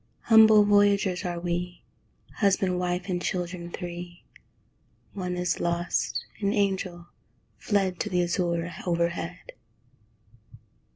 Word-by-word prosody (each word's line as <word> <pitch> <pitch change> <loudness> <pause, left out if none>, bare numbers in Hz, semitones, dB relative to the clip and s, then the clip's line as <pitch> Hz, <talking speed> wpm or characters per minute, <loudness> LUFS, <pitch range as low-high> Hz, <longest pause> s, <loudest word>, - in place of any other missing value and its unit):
Humble 220 -2 +7
voyagers 205 -2 +3
are 175 -1 -3
we, 175 +1 -4 0.5
Husband, 190 -3 +2
wife, 180 +1 -2
and 180 -2 -2
children 180 -1 -3
three 175 0 -7 0.9
(One 180 -2 -4
is 180 0 -1
lost 170 0 -1
an 200 -1 0
angel, 190 -4 -1 0.5
fled 195 -4 0
To - - -2
the 180 -1 +1
azure 175 -1 -1
overhead!) 170 - -2
180 Hz, 105 wpm, -26 LUFS, 175-200 Hz, 0.9 s, Humble